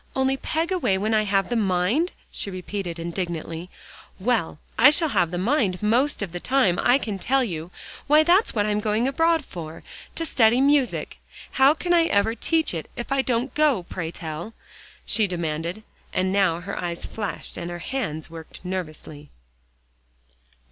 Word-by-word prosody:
"Only 265 0 +2
peg 325 +5 -2
away 340 - +1
when 215 +3 0
I 215 -1 +3
have 195 -1 +1
the 240 - -1
mind?" 210 - +1 0.2
she - - -4
repeated 185 -2 -5
indignantly. 170 0 -4 0.5
"Well, 210 -7 0 0.2
I - - +8
shall 310 +2 +2
have 185 - +2
the 175 - -4
mind 200 -2 +1
most 240 +4 +2
of 190 - -5
the 175 - -5
time, 230 -7 +2
I 245 +2 +5
can 210 -7 -4
tell 260 +8 +2
you. 170 -7 -4 0.4
Why, 300 +2 +6
that's 355 - +3
what 205 -1 +2
I - - 0
am 210 - +1
going 215 +3 +1
abroad 325 +2 +2
for, 165 -2 -8 0.3
to 330 - -1
study 235 -4 +4
music. 280 -1 +1 0.3
How 270 +3 +5
can 350 +1 0
I 335 -1 +5
ever 215 -3 +2
teach 320 - 0
it, 160 -2 -5
if 240 +1 -6
I 275 0 +3
don't 250 0 -1
go, 295 -11 +2
pray 170 -1 -5
tell?" 165 +6 -7 0.5
she 220 -3 +2
demanded, 170 +2 -3 0.3
and 185 +1 0
now 185 -4 +2
her 190 +3 -5
eyes 170 -1 -4
flashed, 205 -7 -4
and 170 - -5
her 175 - -5
hands 175 - -4
worked 165 +2 -11
nervously. 155 -5 -6
205 Hz, 175 wpm, -24 LUFS, 175-265 Hz, 0.5 s, I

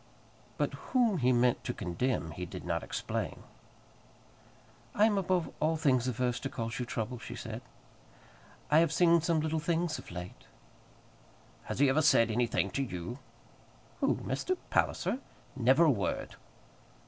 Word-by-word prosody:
But - - 0
whom 235 -8 +1
he 125 -1 +3
meant 125 0 +2
to 125 - -3
condemn 90 0 -1
he 90 +3 -6
did - - -8
not - - -1
explain. - - -4 1.5
"I 210 - +5
am 220 -2 +3
above 185 -3 0
all 160 +1 +1
things 130 -6 +2
averse 125 0 0
to - - -4
cause 115 +1 -4
you 125 - -3
trouble," 120 +2 -3
she - - -8
said. - - -6 1.1
"I 155 - +7
have 165 -2 +3
seen 170 0 +5
some 165 -1 +1
little 160 +1 0
things 165 0 0
of - - -12
late 90 +1 -8 0.6
" - - -28
"Has - - -4
he 140 +2 +5
ever 135 +4 +3
said 115 -7 +5
anything 120 +1 +1
to 140 - -1
you?" 95 0 -5 0.8
"Who, - - +2
Mr. 370 0 -2
Palliser? 255 - +1 0.4
Never 130 +5 +4
a 155 - +6
word." 100 -6 -2
135 Hz, 155 wpm, -31 LUFS, 120-165 Hz, 1.5 s, I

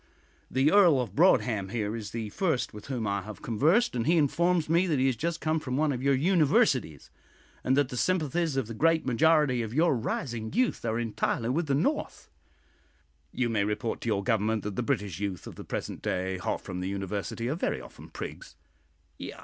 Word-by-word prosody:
The 135 +4 +2
Earl 175 -9 +6
of 115 -7 -3
Broadhem, 115 - +3
here, 105 0 -2
is 110 -3 -6
the 115 -2 -5
first 160 - -1
with 105 -1 -10
whom 125 -5 -3
I 100 -1 -1
have 105 -1 -10
conversed, 155 - +2
and 115 -2 -1
he 170 +1 +4
informs 170 +3 +2
me 170 +4 +3
that 155 -4 +1
he 130 - +2
has 130 -2 +2
just 165 +7 -2
come 160 0 0
from 130 -3 -3
one 155 0 +2
of 125 -2 -3
your 140 0 +3
universities, 150 - +2 0.5
and 130 +1 +2
that 145 -3 +2
the 125 - -5
sympathies 165 -2 0
of 135 - 0
the 115 - -7
great 160 +6 +2
majority 140 0 +3
of 115 +1 -5
your 160 -1 +3
rising 115 -1 -3
youth 255 -1 +1
are 110 0 0
entirely 115 0 -1
with 155 +5 0
the 140 - +2
North." 145 - -2 1.0
"You 125 - 0
may 110 -3 +1
report 105 +2 -2
to - - -5
your 100 -2 0
Government 110 -1 0
that 105 -2 -4
the - - -1
British 105 - -2
youth 100 -4 -4
of - - -8
the - - -9
present - - -5
day, 95 0 -2
hot 90 - -2
from 90 -2 -6
the 90 +1 -3
university, 100 +4 -3
are 135 - 0
very 165 - -2
often - - -12
prigs." - - -8
125 Hz, 205 wpm, -28 LUFS, 110-155 Hz, 1.0 s, Earl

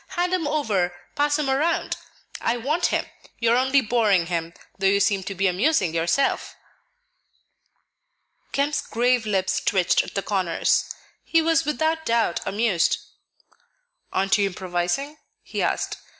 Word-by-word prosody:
Hand 355 +1 +1
him 345 -5 0
over; 205 -13 0 0.2
pass 290 +1 +1
him 300 -2 -1
around. 295 +5 0 0.5
I 235 - 0
want 300 +9 0
him; - - 0 0.3
you 230 -1 +2
are - - +5
only 265 +2 +3
boring 215 -6 +2
him, 170 0 -3 0.2
though 195 - +2
you 200 +1 +3
seem 200 0 +2
to 195 - -5
be 195 +2 0
amusing 190 - +2
yourself." 170 +12 0 2.0
Kemp's 285 +2 0
grave 245 -1 +1
lips 190 -2 +1
twitched 185 -3 +2
at - - -10
the 195 - -1
corners; 185 -5 +1 0.3
he 330 - +2
was 325 0 +2
without 315 +2 0
doubt 230 - +1
amused. 205 -4 +1 1.1
"Aren't 195 +2 +2
you 200 - +3
improvising?" 185 - -3 0.2
he - - -4
asked. - - -1
230 Hz, 140 wpm, -24 LUFS, 190-290 Hz, 2.0 s, are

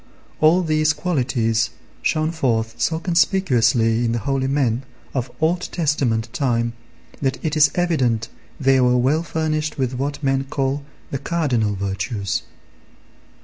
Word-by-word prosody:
All 165 +4 +5
these 155 -1 +2
qualities 130 -7 0 0.3
shone 155 0 +1
forth 115 -8 0
so 160 - +1
conspicuously 130 - +2
in 115 -1 +1
the - - 0
holy 135 -1 0
men 135 -4 +1 0.3
of 130 -2 -2
Old 175 +3 +1
Testament 140 -9 0
time, 120 -4 0 0.5
that 135 -2 0
it 155 -1 0
is 150 -2 +6
evident 130 -11 +1 0.3
they 135 -2 +4
were 125 0 +4
well 135 +6 +2
furnished 155 -1 -2
with 130 -2 -1
what 140 +3 -3
men 135 0 +1
call 135 +1 -1 0.3
the 135 - -2
cardinal 130 - 0
virtues. 100 +1 -2
135 Hz, 135 wpm, -21 LUFS, 120-155 Hz, 0.5 s, is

